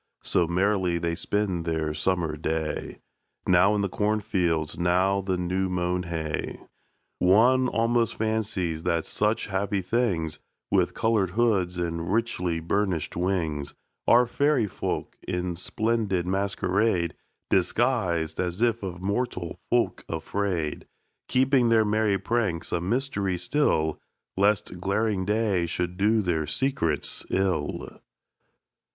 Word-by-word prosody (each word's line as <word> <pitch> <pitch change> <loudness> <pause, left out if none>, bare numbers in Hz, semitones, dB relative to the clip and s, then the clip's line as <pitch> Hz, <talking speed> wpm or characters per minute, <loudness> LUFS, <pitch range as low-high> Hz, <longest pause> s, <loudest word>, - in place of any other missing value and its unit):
So 85 - +2
merrily 90 0 +1
they 85 0 -1
spend 95 -1 -1
their 80 -2 -1
summer 85 -3 0
day, 80 +1 -3 0.4
Now 95 +3 +4
in 105 - +1
the 100 - +1
cornfields, 95 -7 0
now 90 +3 +2
the 95 -1 -1
new 95 +2 -1
mown 90 0 0
hay. 80 -2 -3 0.6
One 120 +8 +5
almost 115 -1 +1
fancies 105 -7 -1
that 85 -1 0
such 105 +2 0
happy 100 0 -1
things, 90 -7 0 0.3
With 95 -3 +2
coloured 110 -5 +2
hoods 95 -4 +1
and 85 0 -2
richly 90 -7 0
burnished 85 -1 -1
wings, 80 -6 -1 0.3
Are 120 +1 +6
fairy 140 0 +2
folk, 100 - -4
in 90 -1 -2
splendid 105 -1 -1
masquerade 95 -1 0 0.4
Disguised, 90 -6 +1
as 90 +1 -2
if 115 -1 +2
of 90 -2 -6
mortal 100 -4 -2
folk 120 -1 +1
afraid, 85 -1 -2 0.4
Keeping 130 -1 +3
their 110 -1 +4
merry 105 -1 +2
pranks 95 -5 -1
a 85 - 0
mystery 100 -3 -1
still, 90 - +1 0.3
Lest 100 -2 +1
glaring 100 +1 0
day 105 -4 +1
should 90 +1 -2
do 105 +3 +2
their 80 -4 0
secrets 85 - -1
ill. 90 -6 -1
95 Hz, 120 wpm, -26 LUFS, 85-110 Hz, 0.6 s, Are